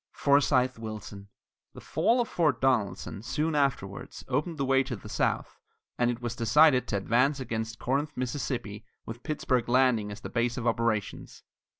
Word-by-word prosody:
FORCEYTHE 135 -3 +2
WILLSON. 105 -2 -8 0.5
The - - -9
fall 240 +2 +1
of 235 - -2
Fort 150 -8 +1
Donelson, 115 -6 0
soon 155 +8 -1
afterwards, 135 -9 -2
opened 150 +6 -1
the 140 - 0
way 135 0 +4
to 130 -2 -4
the 100 - -11
south - - -1 0.4
and 120 -1 +3
it 120 0 -4
was 120 -1 -3
decided 130 +1 +4
to 100 - -1
advance 125 +8 +2
against 110 -3 -4
Corinth, 140 +6 -1
Miss., 130 +3 -3 0.5
with 115 +2 -8
Pittsburg 130 -6 -1
Landing 120 -5 +3
as 105 - -8
the - - -6
base 120 0 0
of 120 - -4
operations. 115 -3 -1
125 Hz, 165 wpm, -28 LUFS, 115-140 Hz, 0.5 s, way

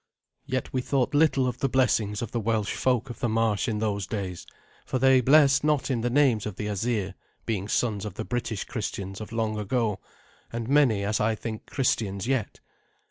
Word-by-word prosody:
Yet 130 0 -3
we 130 - +1
thought 135 +1 0
little 145 -3 +3
of 125 - -3
the 135 - +1
blessings 115 -4 +1
of 115 - -5
the 120 - -1
Welsh 110 -2 0
folk 125 -1 0
of - - -10
the 120 - 0
marsh 110 0 +1
in 110 -3 -1
those 105 -3 -1
days, 95 -5 -5 0.4
for - - -2
they 130 0 +5
blessed 140 +1 +5
not 150 -2 +1
in 120 -3 0
the 120 - 0
names 125 -6 +3
of 105 - -6
the 105 - -4
Asir, 105 -1 -1 0.3
being 100 -4 -2
sons 105 -3 0
of 105 -4 -6
the 110 - -4
British 120 -4 -2
Christians 100 -4 -5
of 110 - -8
long 110 -2 -1
ago, 105 -1 -1 0.5
and 115 -1 -4
many, 130 -7 +3
as 105 +2 0
I 110 +1 +1
think, 110 0 -6
Christians 105 -7 -1
yet. 130 -6 -1
115 Hz, 195 wpm, -26 LUFS, 105-130 Hz, 0.5 s, they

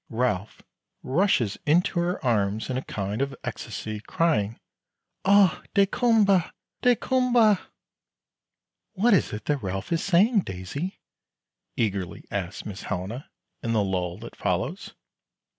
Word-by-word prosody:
Ralph 110 -4 -2 0.4
rushes 130 - +1
into 175 +4 +2
her 175 -3 -1
arms 110 0 +1
in 125 - -1
a - - -1
kind 105 -1 -3
of 140 0 -1
ecstasy, 110 -1 -5
crying, 115 -4 0 0.7
"Oh, 200 -3 +5
daykumboa! 200 -3 +3 0.3
daykumboa!" 245 -3 +3 1.3
"What 215 +3 +3
is 195 - +3
it 105 +1 -6
that 145 -2 0
Ralph 95 - -4
is 165 0 +1
saying, 200 +5 +4
Daisy?" 140 - -5 0.8
eagerly 100 -5 -2
asks 95 -1 -4
Miss 100 -2 -6
Helena, 100 +9 -5 0.3
in 115 - -1
the 110 -2 +3
lull 90 -2 -2
that 115 - -10
follows. - - -2
130 Hz, 120 wpm, -26 LUFS, -, 1.3 s, Oh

